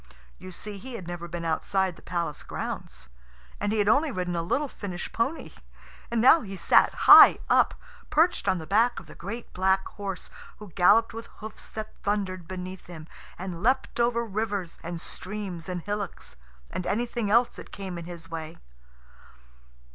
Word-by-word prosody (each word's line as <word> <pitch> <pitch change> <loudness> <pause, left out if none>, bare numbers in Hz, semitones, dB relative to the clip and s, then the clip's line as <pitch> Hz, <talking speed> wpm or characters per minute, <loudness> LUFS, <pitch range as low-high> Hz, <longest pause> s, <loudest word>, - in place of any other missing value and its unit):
You 185 - -9
see, 205 +2 -7
he 255 +4 -8
had 185 -6 -7
never 175 -1 -5
been 170 0 -5
outside 185 +3 0
the - - -16
palace 170 -4 -3
grounds. 65 0 -6 0.5
And 205 0 0
he 220 - 0
had 205 -1 +2
only 285 +8 +4
ridden 180 -4 -2
a 170 - 0
little 275 - 0
Finnish 185 -8 -6
pony. 270 +8 -2 0.6
And 235 - 0
now 265 +8 +7
he 195 -3 -7
sat - - +4
high - - +11
up, - - +4 0.3
perched 330 +4 +2
on 185 - +3
the 160 - -6
back 230 +7 +2
of - - -14
the - - -12
great 215 +7 -7
black 190 +1 +2
horse, 195 -2 -6 0.3
who 210 -2 -11
galloped 210 +7 +4
with 230 +1 -7
hoofs 220 0 -10
that 215 0 -6
thundered 190 -4 -2
beneath 185 0 -7
him, 165 -3 -9 0.3
and 180 -2 -6
leapt 255 +2 +1
over 235 0 +2
rivers 200 -4 -3
and 170 0 -5
streams 185 -2 -5
and 180 -2 -4
hillocks, 205 -1 -5 0.4
and 180 - -4
anything 235 0 -1
else 235 +3 +3
that - - -10
came 190 -3 -6
in 170 - -8
his 170 -1 -9
way. 160 -1 -6
195 Hz, 175 wpm, -27 LUFS, 175-220 Hz, 0.6 s, high